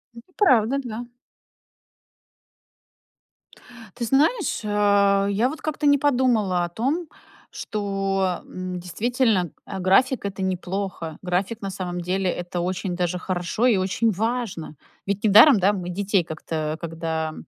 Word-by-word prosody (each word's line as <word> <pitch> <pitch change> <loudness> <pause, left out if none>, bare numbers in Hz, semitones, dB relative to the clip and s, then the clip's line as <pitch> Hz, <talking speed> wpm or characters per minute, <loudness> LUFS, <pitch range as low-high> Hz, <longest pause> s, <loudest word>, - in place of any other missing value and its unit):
Это 235 +10 -14
правда, 260 - +3
да. 240 0 -6 2.9
Ты 240 - -2
знаешь, 310 - +1
э, - - -5 0.6
я 220 +6 +1
вот 315 +3 -8
как-то 305 -1 -1
не 285 0 +6
подумала 245 -10 +2
о - - -6
том, 275 - -2 0.4
что, 195 -3 -2
м, 185 0 -6
действительно, 210 +1 0 0.2
э, 190 - -6
график- 215 +8 +3
это 195 -1 -4
неплохо. 185 -3 -3
График 185 +5 -2
на 195 - -3
самом 180 -2 -4
деле- 185 +2 -1
это 175 0 -4
очень 185 +1 -2
даже 180 0 -1
хорошо 180 +5 -2
и 240 -5 +4
очень 190 +5 +1
важно. 220 -6 -3 0.3
Ведь 200 +2 -2
недаром, 220 +5 +8
да, 195 +2 +3
мы 180 -3 -4
детей 195 0 0
как-то, 155 -1 -4
когда, 160 -1 -3
195 Hz, 130 wpm, -23 LUFS, 180-235 Hz, 2.9 s, недаром